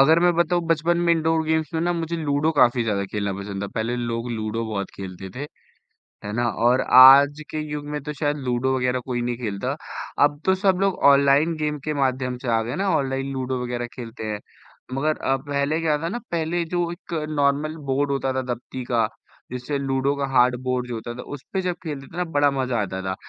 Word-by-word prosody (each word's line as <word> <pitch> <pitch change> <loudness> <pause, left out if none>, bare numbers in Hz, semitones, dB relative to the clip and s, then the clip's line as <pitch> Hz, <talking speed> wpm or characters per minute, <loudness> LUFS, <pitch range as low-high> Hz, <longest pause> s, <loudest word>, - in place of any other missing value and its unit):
अगर 160 +5 +6
मैं 175 0 +4
बताऊँ 170 +1 +2
बचपन 165 +1 +2
में 170 -1 +3
इंडोर 160 0 +1
गेम्स 160 -2 0
में 160 - +1
ना 175 +1 +1
मुझे 170 0 -2
लूडो 150 -1 +1
काफ़ी 125 -4 +4
ज़्यादा 105 -3 -1
खेलना 100 -1 -1
पसंद 100 0 -5
था, - - -2
पहले 115 +2 -1
लोग 120 0 -3
लूडो 110 0 -2
बहुत 100 -2 -3
खेलते 95 -1 -7
थे 140 +3 -4 0.8
है 105 - -4
ना? 120 0 +1
और 120 +3 +2 0.2
आज 140 +3 +8
के 155 - -3
युग 150 -1 -4
में 150 - -2
तो 150 +1 -4
शायद 145 +1 -1
लूडो 125 +2 +1
वग़ैरह 125 0 0
कोई 125 -2 -2
नहीं 120 0 -2
खेलता 105 -5 -3 0.5
अब 145 0 +1
तो 190 - +4
सब 190 -1 +2
लोग 195 -1 +1
ऑनलाइन 140 +4 +4
गेम 150 -1 -2
के 155 - -1
माध्यम 130 -2 0
से 130 - -4
आ - - 0
गए 120 +3 -4
ना, 195 +1 0
ऑनलाइन 135 -1 -2
लूडो 130 -1 -2
वग़ैरह 120 0 -3
खेलते 115 -2 -7
हैं 105 - -5 0.5
मगर 150 +3 0
अ, 135 - 0
पहले 140 +3 -1
क्या 155 -2 +2
था 165 - -1
ना 230 +7 -3
पहले 170 +1 -1
जो 175 -1 0
एक 175 0 -8 0.2
नॉर्मल 145 +1 +1
बोर्ड 140 +2 +1
होता 135 -1 0
था, 130 0 -1
दबती 125 +1 -5
का 120 -2 +1 0.4
जिससे 125 +3 -3
लूडो 135 0 0
का 140 -1 -1
हार्ड 125 -1 +4
बोर्ड 125 -1 -1
जो 120 - -4
होता 115 +1 -5
था 125 - -7
उसपे 145 +8 -4
जब 180 -1 -1
खेलते 145 -4 -5
थे - - -10
ना 180 - 0
बड़ा 145 0 +5
मज़ा 130 -4 -1
आता 95 -2 -3
था। 95 0 -2
135 Hz, 220 wpm, -23 LUFS, 120-155 Hz, 0.8 s, आज